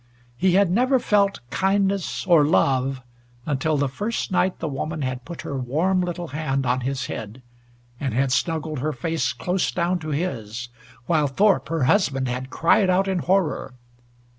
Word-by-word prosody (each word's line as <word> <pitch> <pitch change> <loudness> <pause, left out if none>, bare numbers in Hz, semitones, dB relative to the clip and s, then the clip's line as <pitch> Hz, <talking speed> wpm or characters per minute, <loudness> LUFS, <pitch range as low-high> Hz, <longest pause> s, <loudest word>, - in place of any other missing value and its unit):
He 185 +7 +2
had 195 -1 +4
never 255 +7 +3
felt 200 -4 +1
kindness, 195 -1 0
or 170 -5 +5
love, 135 -3 +1 0.4
until 150 +2 0
the 145 0 +1
first 205 - -3
night 185 0 +1
the 165 - -4
woman 155 +2 -3
had 130 -1 -4
put 170 -1 -8
her 140 - -4
warm 165 +9 +1
little 175 -1 -4
hand 140 -2 -2
on 125 +1 +1
his 130 +1 -2
head, 110 +3 -7 0.6
and 135 -3 -2
had 130 +3 +1
snuggled 155 0 -1
her 155 +4 -1
face 130 -1 -1
close 185 +1 -1
down 175 +1 0
to 155 -1 -6
his, 120 - -3 0.4
while 150 0 +2
Thorpe 195 +8 +2
her 165 -3 0
husband 135 -4 +2
had 125 +1 -4
cried 175 +6 +3
out 190 +2 +2
in 190 -2 0
horror. 180 -7 0
155 Hz, 165 wpm, -23 LUFS, 130-185 Hz, 0.6 s, or